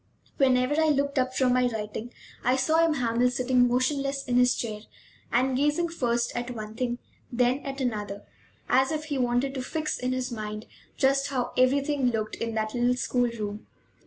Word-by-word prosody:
Whenever 260 +2 +3
I 315 - +3
looked 280 -2 +1
up 255 0 0
from 255 -2 +3
my 250 0 +3
writing 220 +1 -5 0.3
I 250 +2 +3
saw 315 +5 +3
M. 325 -2 +2
Hamel 245 -1 +2
sitting 250 0 +2
motionless 275 +2 0
in 245 -3 0
his 250 0 +4
chair 215 -3 -4 0.5
and 255 +2 +2
gazing 295 +5 +1
first 240 -7 -1
at 240 +1 -3
one 215 -3 -6
thing, 240 +1 -2 0.3
then 250 +2 +2
at 275 0 -5
another, 210 -5 -3 0.4
as 265 +3 +3
if 310 -1 -2
he 290 -3 -2
wanted 245 +2 +1
to 265 - -3
fix 305 +4 -3
in 250 0 -1
his 255 0 -2
mind 215 -1 -5 0.3
just 275 +1 +2
how 255 -3 -2
everything 275 +1 +2
looked 220 -2 -1
in 230 -1 -3
that 215 0 -1
little 245 0 +2
school 245 -1 +1
room. 210 -2 -6
250 Hz, 185 wpm, -27 LUFS, 240-275 Hz, 0.5 s, his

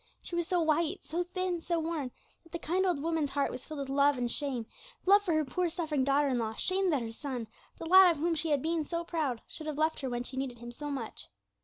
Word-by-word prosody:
She 345 - -5
was 345 -1 0
so 360 - +2
white, 325 +3 +1
so 335 +3 -2
thin, 360 -1 -2
so 340 0 0
worn, 320 -5 -2 0.3
that 330 - -22
the 340 - -3
kind 360 +4 0
old 350 -6 +1
woman's 325 -3 0
heart 280 0 0
was 255 - -7
filled 305 -2 -5
with 275 - -4
love 280 0 +4
and 250 - -1
with 240 - -1
shame 265 -5 -1 0.4
love 400 +2 +7
for 365 -5 0
her 310 -1 +2
poor 350 +7 0
suffering 315 -5 -1
daughter 280 +2 +3
in 250 -2 +1
law, 220 -1 -2
shame 375 - +1
that 285 -7 +1
her 225 - -5
son, 250 -2 -4 0.3
the - - -7
lad 375 +2 +8
of 335 - +1
whom 335 +3 +1
she 320 0 0
had 285 -3 +2
been 325 0 +1
so 335 +3 -3
proud, 300 -9 -2
should 310 - -8
have 300 -2 -3
left 315 +1 +1
her 265 - -3
when 240 0 -2
she 260 +1 -7
needed 260 -2 -3
him 240 +1 -8
so 295 +5 -6
much. 260 -6 -4
310 Hz, 270 wpm, -31 LUFS, 270-340 Hz, 0.4 s, lad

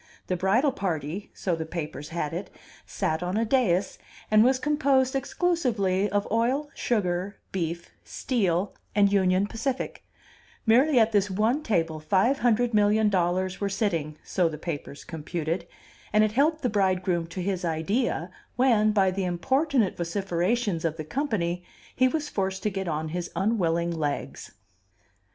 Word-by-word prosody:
The 185 - -1
bridal 215 - +2
party 175 - -3
(so 180 -3 -1
the 160 - -3
papers 155 -2 -6
had 165 -2 -3
it) 185 +4 -4 0.4
sat 160 +1 -1
on 180 +3 -1
a 230 - +2
dais, 210 -7 +1 0.3
and 215 0 +7
was 260 +2 +4
composed 275 -2 +2
exclusively 245 - 0
of 205 +1 0
Oil, 255 +6 +1
Sugar, 195 -3 -1 0.2
Beef, 170 -2 -3
Steel, 195 -6 -1 0.2
and 200 -1 +4
Union 190 0 +3
Pacific; 250 +5 -3 0.6
merely 255 +5 +4
at 225 0 +4
this 205 -1 +2
one 220 +9 +1
table 165 - 0
five 195 - +2
hundred 240 0 +2
million 210 +1 +4
dollars 185 0 0
were 200 - 0
sitting 170 -7 -1
(so 180 -3 +1
the 155 - -6
papers 150 -3 -6
computed), 165 +1 -4 0.4
and 215 0 +5
it 215 - +2
helped 300 +6 +2
the - - +3
bridegroom 185 -4 +1
to 170 +3 -7
his 185 0 -2
idea, 175 +3 -1 0.2
when, 225 -4 +4
by 195 -3 +3
the 195 +1 -2
importunate 255 - +1
vociferations 180 +2 -1
of 165 -1 -1
the 155 - -5
company, 180 - -1 0.3
he 255 - +4
was 300 +2 -2
forced 190 -5 -2
to 210 - 0
get 190 -1 -3
on 155 -1 -2
his 175 +1 -4
unwilling 170 -5 +1
legs. 150 -3 -3
195 Hz, 150 wpm, -26 LUFS, 170-230 Hz, 0.6 s, and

